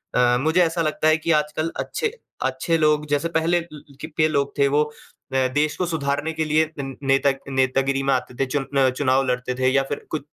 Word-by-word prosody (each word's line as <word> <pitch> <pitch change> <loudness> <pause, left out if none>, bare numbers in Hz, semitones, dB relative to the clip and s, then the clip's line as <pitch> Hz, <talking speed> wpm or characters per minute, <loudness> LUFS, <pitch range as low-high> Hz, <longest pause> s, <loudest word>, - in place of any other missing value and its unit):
अ, 125 0 +4
मुझे 160 +5 +3
ऐसा 165 0 0
लगता 155 0 0
है 155 0 +5
कि 165 +1 -1
आजकल 150 +1 0
अच्छे 450 -2 -2 0.3
अच्छे 165 -2 0
लोग 150 -1 +2
जैसे 145 +3 0
पहले 165 +1 +1
ले 150 -3 -10
के 155 0 +1
लोग 140 -2 -1
थे 140 -1 +4
वो 145 +2 +3
अ, 150 - -8 0.6
देश 150 +1 +1
को 180 - 0
सुधारने 155 -1 -2
के 160 0 -1
लिए 155 +1 +2
नेता 135 0 +1 0.2
नेतागिरी 135 +1 +1
में 135 - +2
आते 125 -1 -2
थे 135 - +2
चुन 135 +1 -2
अ, 135 -1 +5
चुनाव 130 0 +1
लड़ते 125 0 -1
थे। 130 0 +2
या 135 - +4
फ़िर 140 +1 -6
कुछ 155 -3 -3
150 Hz, 210 wpm, -22 LUFS, 135-155 Hz, 0.6 s, है